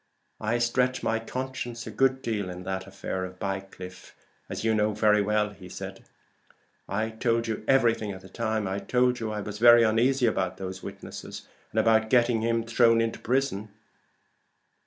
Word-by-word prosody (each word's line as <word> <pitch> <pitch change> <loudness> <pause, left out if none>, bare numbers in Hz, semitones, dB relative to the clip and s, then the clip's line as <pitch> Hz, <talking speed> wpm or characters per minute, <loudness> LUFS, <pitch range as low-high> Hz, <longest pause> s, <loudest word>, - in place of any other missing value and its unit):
"I 110 +2 0
stretched 125 +2 +1
my 115 0 +1
conscience 125 -1 -5
a 110 - -6
good 130 +4 +2
deal 105 -5 -2
in 90 0 -7
that 95 0 -4
affair 95 -1 -4
of 90 0 -7
Bycliffe, 95 -1 -6 0.3
as - - -4
you 110 0 +2
know 105 -1 +1
perfectly 105 -1 +4
well. 105 0 0 1.3
I 110 +3 -1
told 115 +1 0
you 110 -1 -3
everything 115 -5 +3
at 95 -1 -8
the 95 - -13
time. 110 +1 -1
I 95 +1 -2
told 125 +2 +1
you 110 -2 -3
I 105 -1 -3
was 105 0 -6
very 120 0 +8
uneasy 120 +4 +3
about 95 -5 0
those 95 0 -6
witnesses, - - -8 0.2
and - - 0
about 110 -1 +3
getting 120 -2 +3
him 115 0 +1
thrown 115 0 +4
into 115 0 -1
prison. 120 -5 -1
110 Hz, 165 wpm, -27 LUFS, 100-120 Hz, 1.3 s, very